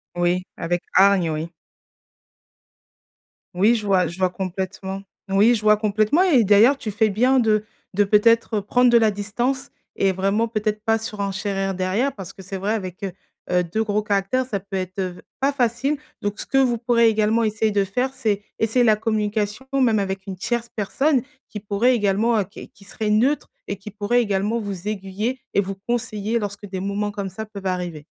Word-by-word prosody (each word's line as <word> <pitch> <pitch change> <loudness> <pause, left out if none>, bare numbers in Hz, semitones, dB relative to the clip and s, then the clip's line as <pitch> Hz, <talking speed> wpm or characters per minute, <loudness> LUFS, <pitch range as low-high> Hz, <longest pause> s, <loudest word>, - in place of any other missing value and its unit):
Oui, 175 +1 0
avec 175 +1 -2
hargne, 190 -3 +5
oui. 160 +2 -4 2.0
Oui, 205 +6 +4
je 215 - -3
vois, 190 -2 +3
je 170 - -6
vois 185 -1 +2
complètement. 190 +1 -4 0.3
Oui, 205 +5 +5
je 220 - -1
vois 215 0 +5
complètement 215 - +2
et 315 -11 +5
d'ailleurs, 220 +7 +5
tu 220 - -4
fais 215 +1 +2
bien 250 +6 +3
de 215 -3 +2 0.3
de, 205 +2 +4
peut-être, 215 +1 +3
prendre 245 +5 +3
de 240 - +5
la 225 -2 +5
distance 240 +6 -2 0.3
et 195 -1 +2
vraiment 195 +5 0
peut-être 215 -1 -2
pas 225 0 +2
surenchérir 200 -2 -3
derrière, 190 +9 0
parce 195 -2 -8
que - - -15
c'est 190 +1 -6
vrai 195 +3 -1
avec, 185 -5 -4
heu 190 - -3 0.4
heu, 180 0 +3
2 215 +7 -1
gros 210 0 0
caractères, 205 +5 0
ça 200 -6 -3
peut 195 0 -6
être, 185 +1 -6
heu, 185 - 0
v 175 - -12 0.2
pas 275 +1 +2
facile. 265 +2 0 0.2
Donc 205 +1 -3
ce - - -6
que - - -1
vous 250 -3 +3
pourrez 235 0 +3
également 220 +1 +2
essayer 215 0 +1
de 200 -1 +2
faire, 250 +7 -2
c'est 215 -6 -1 0.2
essayer 225 +3 +2
la 215 - +5
communication, 215 +2 -1
même 240 -5 +3
avec 195 0 -3
une 190 -2 -5
tierce 235 +4 -2
personne, 265 +7 +1 0.3
qui 210 - -6
pourrait 215 +5 +2
également, 220 +1 +2
heu, - - 0
qui 190 - -12
qui 200 - -20
serait 210 +1 -3
neutre 255 +8 +2 0.2
et 200 - -2
qui 200 +2 -10
pourrait 215 +4 +1
également 205 +1 0
vous 200 -3 -5
aiguiller 210 +5 -3
et 200 - +3
vous 195 0 -4
conseiller 230 -2 -1
lorsque 205 -1 -5
des 190 -1 -5
moments 200 +2 -2
comme 200 -1 -4
ça 190 +4 -6
peuvent 200 -3 -9
arriver. 175 -5 -3
210 Hz, 195 wpm, -22 LUFS, 195-230 Hz, 2.0 s, hargne